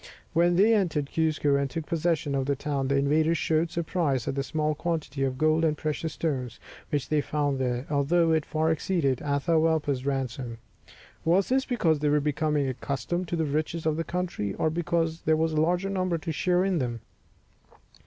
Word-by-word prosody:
When 175 +1 +3
they 210 +5 +5
entered 165 -9 0
Cuzco, 155 -3 +2
and 140 -1 -1
took 160 +2 -4
possession 165 -3 0
of 135 -1 -1
the 140 - +1
town, 140 -1 -2
the 140 - +1
invaders 155 +4 +2
showed 160 +1 +1
surprise 160 -7 -1
at - - 0
the 140 - -1
small 155 +3 -1
quantity 150 -4 -3
of 130 -1 -1
gold 155 +2 +2
and 155 -2 +2
precious 155 +1 -3
stones 130 -7 -3 0.3
which 145 -3 -1
they 150 -1 +2
found 145 -2 -1
there, 125 0 -1
although 160 +4 +2
it 160 -1 +2
far 160 +2 0
exceeded 160 -5 0
Atahualpa's 145 -1 +1
ransom. 130 -3 -3 0.7
Was 180 +4 +2
this 265 +1 +2
because 170 - +1
they 150 0 +1
were 150 +1 +3
becoming 150 0 0
accustomed 140 +7 -3
to 170 - -2
the 160 -1 0
riches 155 +3 -2
of 155 -1 +2
the 165 - -1
country, 170 - -3
or 160 - 0
because 165 0 -1
there 155 0 +2
was 160 0 0
a 155 - +2
larger 180 +4 +1
number 185 -3 0
to 160 +1 -4
share 180 +4 +1
in 190 -4 +1
them? 120 -3 -3
155 Hz, 190 wpm, -27 LUFS, 140-165 Hz, 0.7 s, they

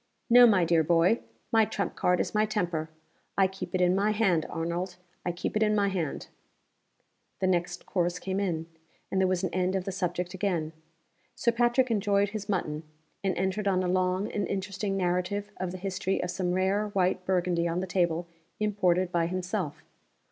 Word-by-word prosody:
_ - - -45 0.3
No, 245 0 +9
my 190 -6 +4
dear 165 -1 +3
boy! 170 +7 +3 0.3
My 225 -1 +5
trump 200 -1 -2
card 180 0 +2
is - - -1
my 210 0 +3
temper. 175 -7 -1 0.5
I 195 - +5
keep 190 -1 -5
it 185 - +1
in 180 0 +4
my 200 +2 +2
hand, 195 -7 +2
Arnold 170 +2 -3 0.3
I 175 - 0
keep 175 +4 -4
it 215 - +1
in 210 -1 +3
my 200 -1 +2
hand!" 175 -6 -3 1.1
The - - 0
next 175 -2 0
course 175 -1 0
came 190 +1 -2
in 170 -5 -1 0.5
and 190 - +2
there 190 - +4
was 185 0 0
an 185 - -2
end 185 +1 +1
of 190 - 0
the 195 - -2
subject 180 -1 -2
again. 175 -5 -1 0.6
Sir 235 - +2
Patrick 240 +1 +2
enjoyed 205 -1 +2
his 205 0 -6
mutton, 155 -6 -1 0.4
and 190 -2 0
entered 190 +3 -1
on 185 -1 +2
a - - 0
long 185 +2 +1
and 205 - -1
interesting 195 0 -2
narrative 185 +3 -1
of 185 -1 -3
the 185 - -6
history 190 0 -2
of 180 - -2
some 180 -1 -1
rare 190 +3 +1
white 185 -2 0
Burgundy 180 -2 +1
on 170 +1 -1
the 185 - -2
table 175 -2 0 0.3
imported 185 -4 +1
by 170 -1 +1
himself. 180 -2 -3
185 Hz, 190 wpm, -28 LUFS, 175-200 Hz, 1.1 s, No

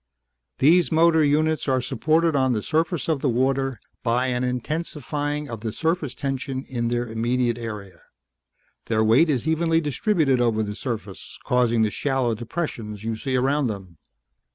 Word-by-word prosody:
These 170 +5 +4
motor 160 0 +4
units 155 +2 +1
are 130 -1 +2
supported 155 +6 +1
on 130 -2 +2
the 105 -3 -2
surface 160 0 0
of 155 -5 0
the 140 - +1
water 130 0 0 0.2
by 125 +2 +1
an 125 0 -1
intensifying 145 +2 -3
of 115 -4 -6
the 110 0 -4
surface 160 - -1
tension 135 -1 -3
in 120 -3 -3
their 120 +1 0
immediate 120 +1 0
area. 105 -5 -7 0.8
Their 110 -1 +1
weight 120 +10 +4
is 135 -1 0
evenly 165 +1 +2
distributed 150 - +1
over 110 -2 +2
the 105 -1 -4
surface, 110 -4 -6
causing 120 -2 +2
the 105 - +1
shallow 135 -3 0
depressions 110 - -5
you 115 0 -2
see 130 +4 -3
around 135 +2 +2
them. 95 -7 -7
130 Hz, 155 wpm, -24 LUFS, 115-150 Hz, 0.8 s, These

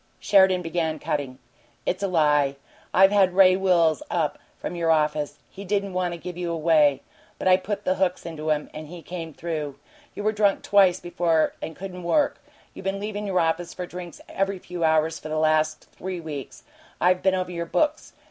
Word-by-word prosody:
Sheridan 190 -2 +4
began 165 -1 -1
cutting. 145 -5 -3 0.5
"It's 185 - -1
a 200 - +1
lie. 150 -5 +2 0.4
I've 195 +1 +6
had 190 -3 +3
Ray 185 -1 +7
Wills 175 -5 +3
up - - -1 0.2
from 175 - -5
your 170 -1 0
office. 150 -2 +1
He 195 - -10
didn't 200 0 -1
want 180 -1 0
to - - -8
give 180 +1 -7
you 175 -1 -2
away, 155 -4 +3 0.3
but - - -3
I 185 - +7
put 205 +2 -4
the 185 - +3
hooks 185 -1 -1
into 160 -2 -5
him, 150 -1 -1
and 155 0 -7
he 170 +1 -10
came 170 -2 -6
through. 155 -3 -4 0.4
You 205 - -5
were 215 - +2
drunk 205 -2 +1
twice 195 -3 +4
before 170 -2 +1
and 160 - -6
couldn't 185 -1 -7
work. 285 - +1 0.3
You - - -9
been 195 +1 -2
leavin' 210 0 -4
your 185 -2 +1
office 170 +1 -1
for 180 - -4
drinks 175 -1 -9
every 195 0 -1
few 180 -1 -6
hours 160 0 +2
for 155 - -8
the 155 - -2
last 155 0 +1
three 185 -1 -6
weeks. 145 -6 -7 0.4
I 180 +1 +5
been 190 +1 +1
over 185 -1 -2
your 170 -1 -4
books. 305 - 0
175 Hz, 195 wpm, -25 LUFS, 155-190 Hz, 0.5 s, Ray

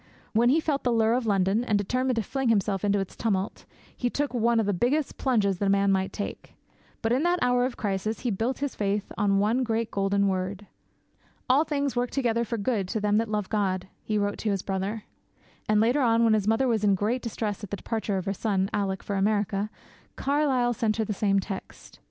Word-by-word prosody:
When 235 +2 +4
he 300 +5 +4
felt 300 -3 -1
the 245 - +1
lure 225 -1 +3
of 245 -2 0
London, 195 +2 +2
and 215 -4 +1
determined 255 +5 0
to 225 - 0
fling 265 +3 -1
himself 200 -3 +1
into 205 0 +2
its 195 -2 -4
tumult, 200 -3 -2 0.3
he 245 - -1
took 285 +2 -2
'one 235 -1 +2
of 220 - +1
the 205 - +1
biggest 255 - 0
plunges 205 -8 +1
that 200 - +1
a - - +2
man 200 0 +3
might 190 0 0
take.' 205 - -6 0.5
But 225 - +1
in 255 +3 +2
that 350 +2 +2
hour 245 0 +3
of 255 - -4
crisis 205 +1 -2
he 245 - -1
built 225 +6 -1
his 280 - -4
faith 205 0 -2
on 200 -1 +2
one 215 +6 +2
great 230 -2 -1
golden 200 0 +1
word. 190 +1 -2 0.8
'All 275 +5 +4
things 280 -3 -1
work 245 0 0
together 235 -4 0
for 230 0 -3
good 205 -2 -1
to 220 +4 -2
them 210 0 +2
that 225 0 0
love 210 -2 -1
God,' 190 -3 -1
he 215 - -1
wrote 205 0 -1
to 220 - -1
his 195 -2 -1
brother. 195 +3 -3 0.7
And, 215 -1 +4
later 240 +6 +3
on, 230 -2 +3
when 225 -1 +4
his 210 -2 +1
mother 225 +4 +3
was 225 -3 +1
in 200 -2 +4
great 220 +6 -1
distress 215 -3 -4
at 205 - -6
the 205 - -3
departure 220 -3 -2
of 185 - -3
her 195 - -1
son, 195 -1 -1
Alick, 195 -2 -1
for 200 - -2
America, 205 0 0 0.5
Carlyle 270 -4 +1
sent 225 -3 0
her 220 - 0
the 210 - -2
same 195 0 +2
text. 195 0 -8
215 Hz, 225 wpm, -27 LUFS, 200-240 Hz, 0.8 s, When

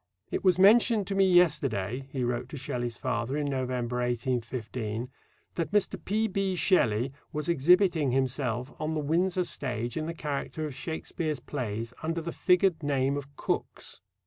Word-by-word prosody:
"It - - -2
was 185 -2 +4
mentioned 215 +2 +6
to 195 - -3
me 195 -1 +4
yesterday," 135 - +2
he 130 -2 -2
wrote 120 0 -2
to 150 - -7
Shelley's 120 -2 -3
father 125 +2 -2
in 150 - -1
November, 125 -3 -2
1815, 120 -1 -2 0.4
"that 165 0 -2
Mr. 195 -4 +1
P.B. 195 -2 0
Shelley 130 - +2 0.2
was 150 -1 -3
exhibiting 170 -1 +4
himself 130 0 -1
on 155 +1 -2
the - - 0
Windsor 175 +5 +1
stage 120 -7 -2
in 155 0 -2
the 165 - -4
character 150 +1 -3
of 150 - -5
Shakespeare's 155 +1 -3
plays, 115 -3 -4
under 165 +1 -1
the 165 +1 -4
figured 180 -2 +3
name 140 -2 +1
of 140 0 -7
Cooks." - - -3
145 Hz, 155 wpm, -28 LUFS, 125-175 Hz, 0.4 s, mentioned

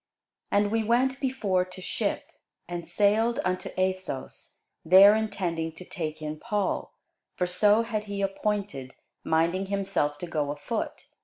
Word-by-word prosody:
And 205 0 +2
we 225 0 +2
went 255 +4 +2
before 215 -9 +1
to 185 0 -10
ship, 185 - -2 0.4
and 175 -1 -5
sailed 210 +6 +2
unto 185 0 -1
Assos, 185 -7 -3 0.2
there 190 +5 +8
intending 170 -7 -2
to 180 - -10
take 155 -3 -5
in 155 0 -4
Paul: 210 -4 -2 0.4
for 180 - 0
so 205 +5 +3
had 215 -2 -3
he 200 -1 -3
appointed, 195 -9 -2 0.3
minding 170 +4 +1
himself 195 -7 -1
to 175 - -5
go 155 -4 -2
afoot. 145 0 -4
190 Hz, 140 wpm, -27 LUFS, 165-210 Hz, 0.4 s, there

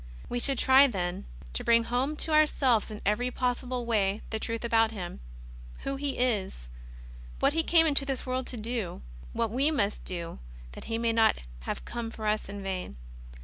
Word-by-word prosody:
We 245 - -1
should 270 +1 +2
try, 265 +2 +7
then, 180 - -3 0.3
to - - -1
bring 230 0 +5
home 255 +6 0
to 320 - -4
ourselves 270 -8 +3
in 210 -1 -7
every 235 +5 +1
possible 250 0 -2
way 210 -3 +1
the 220 - -1
truth 230 +1 -3
about 225 -1 +3
Him 185 - -6 0.3
— - - -15
Who 275 - -2
He 280 0 -2
is; 200 - -1 0.7
what - - +3
He 325 - +2
came 325 0 +5
into 290 -3 +3
this 270 -2 -3
world 255 0 -2
to 250 - -6
do; 220 - -4 0.3
what 230 -2 0
we 270 +6 +3
must 210 -10 0
do 170 - -6 0.3
that - - -10
He 225 0 -2
may 230 0 +1
not 225 -1 +4 0.3
have - - -4
come 235 -1 -4
for 220 -1 -7
us 210 -1 0
in 200 0 -6
vain. 185 - -4
230 Hz, 190 wpm, -29 LUFS, 205-255 Hz, 0.7 s, try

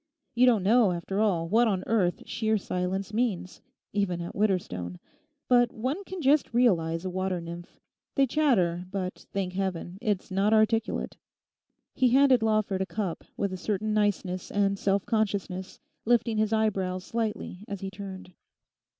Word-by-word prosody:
You 250 +1 +4
don't 225 -6 +4
know, 215 -1 +4
after 175 +3 -3
all, 180 -6 +1
what 230 +6 +4
on 190 -3 0
earth 190 -6 +1
sheer 220 -1 0
silence 190 +1 -3
means—even 200 -3 -2
at 170 - -5
Widderstone. 90 - -1 0.5
But 245 -1 +4
one 260 - -3
can 370 -3 -6
just 275 -3 +3
realize 170 -8 +2
a - - -1
water 185 0 -1
nymph. 170 +1 -9 0.4
They 275 - +4
chatter; 210 - +2
but, 185 -1 -5
thank 190 -2 -2
Heaven, 185 -1 -3
it's 205 -5 -1
not 195 +3 +2
articulate.' 225 +1 +1 0.8
He 255 -1 +3
handed 265 -1 +5
Lawford 215 -3 +1
a 190 - -1
cup 200 -6 -3
with 200 -2 -1
a - - -3
certain 210 +3 -1
niceness 200 -3 0
and 200 -1 +1
self 195 0 +1
consciousness, 200 -4 -2 0.2
lifting 230 -1 +2
his 215 0 +1
eyebrows 195 -4 0
slightly 215 -4 -3
as 200 -2 -6
he 195 0 -4
turned. 190 -2 -9
200 Hz, 150 wpm, -28 LUFS, 185-225 Hz, 0.8 s, handed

